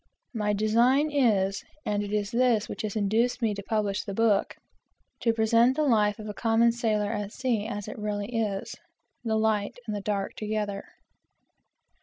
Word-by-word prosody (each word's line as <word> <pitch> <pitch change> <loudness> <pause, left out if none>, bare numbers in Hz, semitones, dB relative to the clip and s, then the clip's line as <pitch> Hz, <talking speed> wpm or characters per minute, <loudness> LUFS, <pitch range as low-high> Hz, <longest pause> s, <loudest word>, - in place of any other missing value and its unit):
My 210 -2 0
design 240 +8 +3
is, 205 -9 +2 0.2
and 205 -1 0
it 205 0 -5
is 210 0 -1
this 235 -3 +2
which - - -6
has 215 -1 -4
induced 220 +4 +1
me 225 -4 +1
to 200 - -6
publish 205 -1 -1
the 200 -2 -6
book, 220 -3 +2 0.6
to 230 - +2
present 230 +3 +3
the 310 - +1
life 210 -5 +3
of 215 - -8
a 210 - -4
common 230 +2 +3
sailor 215 -3 0
at 205 -2 -3
sea 235 -5 -1
as 205 -3 -5
it - - -7
really 210 +2 -3
is, 205 -4 -2 0.5
the 220 -2 0
light 220 -1 0
and 215 - -3
the 205 - -4
dark 200 -1 -2
together. 210 -2 -3
215 Hz, 175 wpm, -27 LUFS, 205-230 Hz, 0.6 s, design